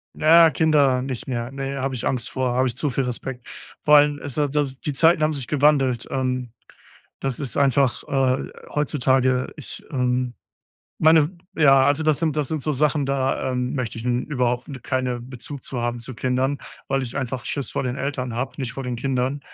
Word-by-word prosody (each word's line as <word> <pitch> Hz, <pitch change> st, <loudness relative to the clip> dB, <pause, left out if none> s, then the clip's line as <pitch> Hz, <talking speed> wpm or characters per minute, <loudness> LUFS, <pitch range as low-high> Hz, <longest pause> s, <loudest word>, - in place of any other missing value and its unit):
Na 155 Hz, -, -2 dB, 0.2 s
ja, -, -, +6 dB
Kinder 145 Hz, -5 st, +3 dB
nicht 130 Hz, -2 st, -5 dB
mehr. 120 Hz, 0 st, -3 dB
Ne, 135 Hz, 0 st, -4 dB
habe 135 Hz, -1 st, -2 dB
ich 120 Hz, -, -4 dB
Angst 125 Hz, -3 st, -1 dB
vor, 130 Hz, -2 st, -1 dB
habe 130 Hz, +1 st, +2 dB
ich 125 Hz, 0 st, -4 dB
zu 150 Hz, -, 0 dB
viel 135 Hz, -, 0 dB
Respekt. 125 Hz, 0 st, -5 dB, 0.3 s
Vor 150 Hz, 0 st, +7 dB
allem, 145 Hz, 0 st, +3 dB
es 140 Hz, 0 st, -6 dB
ist 145 Hz, -1 st, 0 dB
ja 150 Hz, -1 st, +3 dB
die 135 Hz, -1 st, -7 dB
die 145 Hz, -, -2 dB
Zeiten 165 Hz, +2 st, +4 dB
haben 155 Hz, 0 st, +2 dB
sich 135 Hz, -4 st, -4 dB
gewandelt. 135 Hz, -4 st, +2 dB
Ähm, 130 Hz, -2 st, -2 dB, 0.7 s
das 135 Hz, -3 st, -2 dB
ist 140 Hz, -3 st, -3 dB
einfach, 135 Hz, -3 st, +2 dB
äh, 135 Hz, -1 st, +1 dB, 0.2 s
heutzutage 130 Hz, -3 st, +1 dB
ich, 150 Hz, -, -9 dB
äh, 125 Hz, -2 st, 0 dB, 0.7 s
meine, 160 Hz, +2 st, +4 dB, 0.2 s
ja 135 Hz, -3 st, +5 dB
also 145 Hz, +2 st, +2 dB
das 155 Hz, -2 st, +2 dB
sind 160 Hz, -3 st, 0 dB
das 145 Hz, -3 st, 0 dB
sind 155 Hz, -4 st, -2 dB
so 155 Hz, -, 0 dB
Sachen, 145 Hz, +1 st, +1 dB
da, 135 Hz, -1 st, 0 dB
ähm, 125 Hz, +1 st, -2 dB
möchte 120 Hz, -3 st, -3 dB
ich 115 Hz, -, -7 dB
n 125 Hz, 0 st, +1 dB
überhaupt, 125 Hz, -1 st, -1 dB
ne 135 Hz, -3 st, -7 dB
keine 125 Hz, -1 st, -2 dB
Bezug 130 Hz, +2 st, -9 dB
zu 125 Hz, -3 st, -4 dB
haben 120 Hz, 0 st, -2 dB
zu 130 Hz, +2 st, -8 dB
Kindern, 130 Hz, +4 st, 0 dB, 0.3 s
weil 135 Hz, 0 st, +1 dB
ich 125 Hz, -1 st, -5 dB
einfach 130 Hz, -2 st, -3 dB
Schiss 140 Hz, -4 st, -3 dB
vor -, -, -1 dB
den 125 Hz, 0 st, -2 dB
Eltern 130 Hz, -3 st, -3 dB
habe, 130 Hz, +3 st, -3 dB
nicht 130 Hz, -3 st, -4 dB
vor 135 Hz, -, -6 dB
den 125 Hz, -1 st, -3 dB
Kindern. 130 Hz, +2 st, -1 dB
130 Hz, 210 wpm, -23 LUFS, 125-145 Hz, 0.7 s, Vor